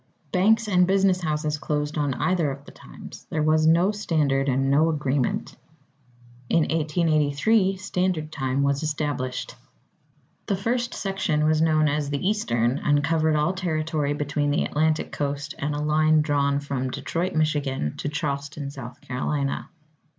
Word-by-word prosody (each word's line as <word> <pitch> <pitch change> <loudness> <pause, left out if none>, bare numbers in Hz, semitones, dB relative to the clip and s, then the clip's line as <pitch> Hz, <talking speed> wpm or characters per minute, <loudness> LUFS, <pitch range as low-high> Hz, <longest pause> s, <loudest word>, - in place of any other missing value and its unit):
Banks 215 +4 +3
and 180 -3 +3
business 190 -1 +3
houses 150 -2 -1
closed 150 +1 -2
on 145 -4 0
either 175 -5 +1
of 140 +1 -7
the - - -12
times. - - -12
There 155 -1 -1
was 155 0 +3
no 170 +5 +4
standard 150 -9 0
and 135 +1 +1
no 155 +4 +4
agreement. 140 -4 -1 0.9
In 165 - +3
1883, 160 +5 +1
Standard 180 -4 -2
Time 135 -1 -1
was 140 0 +1
established. 145 -4 -3 0.9
The 200 - +1
First 240 +5 -1
Section 175 -6 -1
was 155 0 +3
known 155 -1 +3
as 145 -1 -1
the 145 +5 -1
Eastern, 125 - 0
and 145 -1 +2
covered 160 0 +2
all 150 +5 +1
territory 155 -5 -1
between 145 0 -1
the 145 - +1
Atlantic 155 +1 0
Coast 145 0 -3
and 145 +1 -2
a - - -2
line 155 +1 +3
drawn 140 -2 +1
from 135 -2 -3
Detroit, 170 +7 -3
Michigan, 145 - 0
to 145 - -3
Charleston, 145 -1 -4
South 125 -3 -9
Carolina. 140 +2 -2
150 Hz, 150 wpm, -24 LUFS, 140-165 Hz, 0.9 s, no